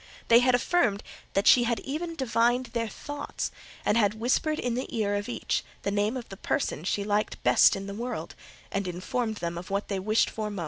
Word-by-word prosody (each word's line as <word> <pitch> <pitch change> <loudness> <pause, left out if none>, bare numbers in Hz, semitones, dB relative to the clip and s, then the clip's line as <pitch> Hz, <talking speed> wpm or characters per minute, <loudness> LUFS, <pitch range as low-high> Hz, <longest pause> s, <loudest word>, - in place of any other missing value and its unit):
They 235 +1 +7
affirmed 245 - +2 0.3
that 195 +2 +1
she 240 -1 +7
had 235 -1 0
even 330 +5 -4
divined 245 -2 +1
their 230 -1 0
thoughts, 290 +7 -5 0.3
and - - +3
had 210 0 +2
whispered 285 +6 +1
in 245 - -1
the 250 +2 -2
ear 205 -2 +1
of 205 +2 -2
each - - -1 0.2
the 200 - 0
name 205 +5 +1
of 245 - -7
the 195 - -9
person 200 - -1
she 200 +2 0
liked 210 +1 -1
best - - +6
in 195 - -5
the 200 - -6
world, 220 -6 -4 0.4
and 200 -1 -1
informed 220 +6 -2
them 170 -3 -4
of 180 - -10
what 200 +1 -2
they 195 -2 -1
most 190 - -9 0.2
wished - - -6
for. 215 -1 -3
220 Hz, 210 wpm, -28 LUFS, 200-245 Hz, 0.4 s, They